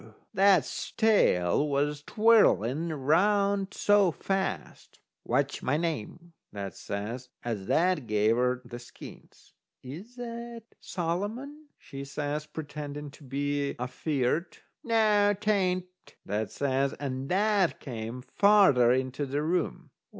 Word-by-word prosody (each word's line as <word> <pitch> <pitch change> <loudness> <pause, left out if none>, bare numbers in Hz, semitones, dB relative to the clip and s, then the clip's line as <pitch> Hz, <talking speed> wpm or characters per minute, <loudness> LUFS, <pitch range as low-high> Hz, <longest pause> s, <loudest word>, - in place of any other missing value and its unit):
that's 195 -4 +3
tail 150 - +3
was 145 +1 0
twirling 170 - +3
round 195 +7 +2
so 205 -4 +3
fast. 195 +4 -4 0.2
"What's 140 +3 -1
my 130 +4 0
name?" 165 +1 -4 0.2
that 100 -2 -6
says, 115 +6 -5
as 110 -5 -4
that 175 -6 +1
gave 105 +1 +2
her 125 +1 0
the 120 0 -8
skeins. 120 - -14 0.3
"Is 175 - -9
that 235 -1 -7 0.2
Solomon?" 215 - -4
she 140 0 -9
says, 145 +2 -4
pretending 145 -1 -7
to 145 - -16
be 140 +1 -2
afeard. 130 +5 -2 0.3
"Noo, 210 -3 +3
'tain't," 190 -3 +1 0.4
that 105 +2 -2
says, 135 0 0
and 135 -1 -5
that 200 -1 +2
came 120 -1 -6
farther 190 - +5
into 130 +2 -1
the 145 +3 -2
room. 170 +1 -2
150 Hz, 115 wpm, -28 LUFS, 130-200 Hz, 0.4 s, farther